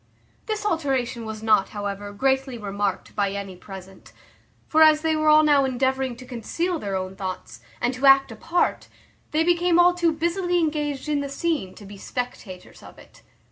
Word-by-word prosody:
This 430 -1 -3
alteration 265 - -1
was 220 0 -7
not, 215 -3 +3
however, 205 0 -4
greatly 265 +3 0
remarked 200 -2 -3
by 200 -1 0
any 200 -2 -6
present; 190 0 -12 0.5
for 315 - +3
as 310 -1 +7
they 320 0 +1
were 310 0 +2
all 305 0 +7
now 290 -2 +4
endeavouring 265 0 0
to 255 +2 -12
conceal 320 +9 -3
their 200 -5 -3
own 185 0 -4
thoughts, 190 -1 -6 0.2
and 245 +2 0
to 260 +2 +1
act 270 0 +6
a - - -8
part, 335 +2 -1 0.4
they 310 +1 +1
became 345 0 +2
all 350 0 +6
too 345 -2 +1
busily 345 +3 0
engaged 300 -4 -1
in 300 -1 0
the 280 - -4
scene 275 - -2
to 205 - -12
be 200 +1 -11
spectators 230 -8 -7
of - - -14
it. - - -18
265 Hz, 180 wpm, -24 LUFS, 205-315 Hz, 0.5 s, as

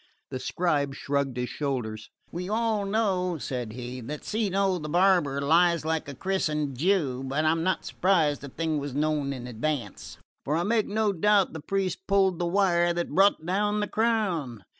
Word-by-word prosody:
The 130 - -3
scribe 145 -1 0
shrugged 140 -3 -2
his 125 0 -2
shoulders. 120 -7 -3 0.2
"We 180 +2 -5
all 220 -1 0
know," 190 -5 0
said 125 -6 -4
he, 125 +1 -6
"that 145 +6 -6
Cino 195 -3 0
the 150 -1 -6
barber 175 -5 +3
lies 165 +3 +3
like 160 -2 -1
a 140 - -7
christened 150 -4 -1
Jew; 145 -4 +1
but 140 +4 -1
I'm 160 +1 +2
not 185 +1 0
surprised 165 -6 +1
the 140 - -8
thing 160 +2 -2
was 140 -2 -5
known 150 -1 0
in 130 -3 -6
advance, 125 -2 -4 0.3
for 150 - -1
I 170 - +1
make 220 +2 +1
no 210 0 +1
doubt 200 +1 +3
the 160 - -5
priests 190 +2 -2
pulled 190 -3 +2
the 175 - 0
wires 175 -2 +2
that 175 0 -2
brought 195 -2 +4
down 205 +3 0
the 210 - -1
crown." 185 - -1
165 Hz, 180 wpm, -27 LUFS, 140-195 Hz, 0.3 s, brought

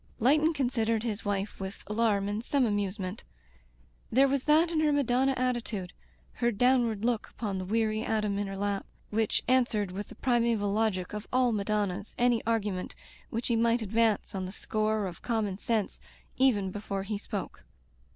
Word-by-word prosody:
Leighton 300 +7 +4
considered 230 -6 0
his 225 -2 -3
wife 205 0 -2
with 190 0 -6
alarm 210 -2 +1
and 205 +2 -2
some 275 0 +2
amusement. 200 -2 -2 0.9
There 270 +4 +5
was 275 -1 0
that 315 +3 +4
in 320 - +1
her 310 -1 +3
Madonna 270 -1 +2
attitude, 235 -7 -2 0.5
her 235 - +4
downward 235 -2 +2
look 235 -3 0
upon 200 -4 -4
the 185 - -4
weary 215 +1 +1
atom 210 -3 0
in 205 - -1
her 195 0 -5
lap, 200 0 -2 0.2
which 220 0 +1
answered 235 -6 +2
with 200 +3 -5
the - - -12
primeval 235 -5 +1
logic 210 -4 0
of 210 0 -5
all 255 -1 +3
Madonnas 205 -2 -1
any 240 -2 +2
argument 205 -5 -1 0.3
which 230 +2 -2
he 235 - +3
might 230 0 +2
advance 220 +1 +1
on 190 -1 -3
the - - -6
score 215 0 -1
of 175 -3 -7
conunon 215 -5 -1
sense, 220 -3 -1 0.4
even 210 -8 +2
before 200 -1 -4
he 205 +1 -3
spoke. 205 -2 -6
220 Hz, 170 wpm, -29 LUFS, 200-240 Hz, 0.9 s, There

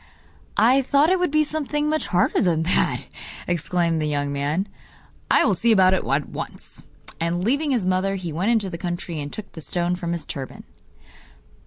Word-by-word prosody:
'I 245 +6 +5
thought 285 +5 +3
it 375 - +3
would 360 - +1
be 305 +1 +3
something 300 -1 -2
much 310 0 0
harder 180 -1 +2
than 165 -3 +2
that,' 175 - +1 0.4
exclaimed 170 -1 0
the 155 - 0
young 145 -1 -1
man. 145 +8 -1 0.6
'I - - +5
will 210 - +3
see 230 +6 +2
about 190 -3 +5
it 190 - 0
at 140 +2 0
once.' - - -8 0.3
And 170 +2 -1
leaving 285 +8 +1
his 240 -8 +1
mother, 185 +1 +1
he 175 -4 -5
went 180 +7 0
into 215 -5 +1
the 170 - -6
country 175 -3 -4
and 145 0 -6
took 215 - -8
the 160 - -9
stone 175 +3 -1
from 170 -1 -3
his 170 - -4
turban. 135 -2 -7
185 Hz, 190 wpm, -23 LUFS, 165-235 Hz, 0.6 s, I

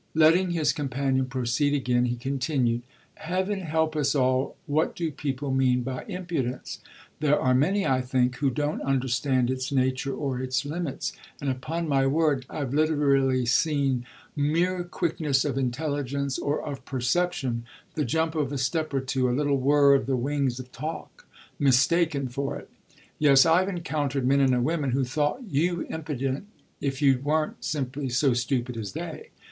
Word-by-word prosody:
Letting 165 +4 +5
his 165 -3 +1
companion 135 -2 -1
proceed 130 +3 0
again 125 -3 +1
he 120 0 -1
continued: 125 -1 0 0.4
"Heaven 185 +4 -2
help 160 -2 0
us 145 -2 +1
all, 130 0 +1
what 155 +1 0
do 165 -2 -2
people 140 -1 -3
mean 125 -2 +2
by 130 0 -5
impudence? 170 - -4 0.4
There 150 -1 +3
are 130 - +2
many, 185 +10 +2
I 130 -3 +2
think, 125 0 0
who 140 0 +1
don't 145 +3 -2
understand 130 -1 +1
its 130 +1 -3
nature 130 0 0
or 135 -4 -2
its 130 +2 -1
limits; 150 -2 -3 0.3
and 140 -2 -1
upon 160 +6 -3
my 135 -2 +2
word 145 -3 +1
I've 140 -4 -4
literally 140 -4 +2
seen 135 -1 +1 0.3
mere 170 +5 +1
quickness 155 -5 0
of 140 -4 -1
intelligence 140 +1 -2
or 145 +1 -1
of 140 -3 -6
perception, 130 -2 -1 0.3
the 150 - -1
jump 160 +2 0
of 150 -4 -1
a 145 - -2
step 145 +3 -1
or 135 - +1
two, 130 -1 0
a 125 - 0
little 145 -2 +1
whirr 140 +1 +5
of 135 -4 +2
the 135 -1 +1
wings 135 -1 -1
of 125 0 -9
talk, 165 - -7 0.3
mistaken 140 +1 +3
for 140 +3 -3
it. - - -13 0.5
Yes, 140 -3 +6
I've 180 +4 +4
encountered 145 -7 -2
men 140 +2 +4
and 130 -3 +3
women 150 -4 0
who 135 +1 +2
thought 150 - -1
you 175 +2 0
impudent 145 0 -3 0.3
if 135 0 -2
you 135 -2 +5
weren't 155 +1 -1
simply 135 -2 -2
so 125 +2 +2
stupid 125 0 -1
as 100 -4 -5
they. - - -6
140 Hz, 165 wpm, -26 LUFS, 130-155 Hz, 0.5 s, Yes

